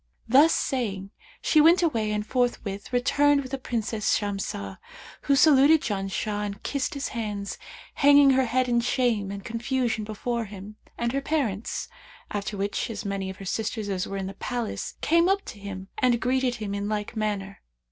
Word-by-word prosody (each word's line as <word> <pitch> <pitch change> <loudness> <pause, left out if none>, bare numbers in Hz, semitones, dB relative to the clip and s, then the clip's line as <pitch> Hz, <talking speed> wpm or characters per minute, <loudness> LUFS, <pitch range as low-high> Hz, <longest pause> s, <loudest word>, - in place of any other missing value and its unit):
Thus 280 +7 +6
saying, 200 -7 -1 0.3
she 310 - +5
went 335 +3 +6
away 225 -10 +1
and 210 0 -1
forthwith 225 -5 -2
returned 285 +3 +3
with 260 - -9
the 270 - -3
Princess 225 -4 0
Shamsah, 195 - -4 0.5
who 280 - +4
saluted 290 +1 +6
Janshah 205 +1 -2
and 200 0 -5
kissed 280 0 -2
his 280 - -3
hands, 210 -4 -4 0.3
hanging 285 -1 +6
her 265 0 +3
head 255 +2 +1
in 240 -1 +2
shame 235 -5 +1
and 200 0 -7
confusion 235 -1 -1
before 230 +2 -3
him 205 +1 -10 0.2
and 235 0 -1
her 275 +2 -1
parents, 255 -9 -2 0.4
after 205 0 -3
which 200 +3 -2
as 215 -3 -5
many 195 -1 -2
of 190 - -8
her 195 - -9
sisters 215 +1 -2
as 185 -2 -2
were 195 - -4
in 195 - -3
the 195 - -5
palace 240 +2 -4
came 335 +2 +3
up 395 +1 +1
to 210 - -9
him 195 -1 -7
and 250 -3 +3
greeted 255 0 +1
him 210 -3 -4
in 200 +1 -2
like 210 +2 -3
manner. 205 -2 -3
225 Hz, 180 wpm, -26 LUFS, 200-260 Hz, 0.5 s, Thus